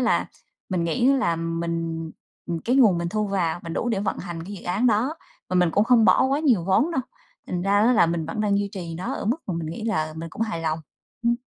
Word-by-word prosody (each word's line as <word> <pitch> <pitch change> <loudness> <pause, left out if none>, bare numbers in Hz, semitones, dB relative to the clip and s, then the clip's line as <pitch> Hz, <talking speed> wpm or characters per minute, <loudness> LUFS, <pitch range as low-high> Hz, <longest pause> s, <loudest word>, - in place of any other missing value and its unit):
là - - +1 0.4
mình 180 -3 0
nghĩ 240 +9 +1
là 240 -12 +1
mình, 165 -1 -3 0.4
ừm, 170 -1 -2
cái 250 +8 +1
nguồn 215 -10 +5
mình 170 0 -2
thu 215 +3 -1
vào 175 -4 0
mình 165 - -5
đủ 240 - -1
để 215 -4 0
vận 200 - -2
hành 170 -3 -6
cái 200 - -8
dự 190 - -10
án 195 +8 +1
đó, 240 +7 +2 0.3
và 185 - 0
mình 180 -2 +4
cũng 205 +5 +3
không 240 -2 +5
bỏ - - +5
quá 275 +2 +1
nhiều 245 - +3
vốn 195 - +3
đâu 265 - +1 0.5
thành 175 -1 -3
ra 195 +2 +1
á 240 +3 +5
là 185 -7 +5
mình 165 -1 -2
vẫn 165 +6 -3
đang 205 -1 +2
duy 200 0 -1
trì 170 -4 -6
nó 180 - -3
ở - - -5
mức 235 - +2
mà 185 - -2
mình 165 -1 -3
nghĩ 170 +8 -5
là 155 -8 -1
mình 165 +1 -5
cũng 225 - -3
hài 215 -7 -2
lòng. 160 0 -1 0.4
Ừm. 235 0 +3
185 Hz, 260 wpm, -24 LUFS, 165-225 Hz, 0.5 s, nguồn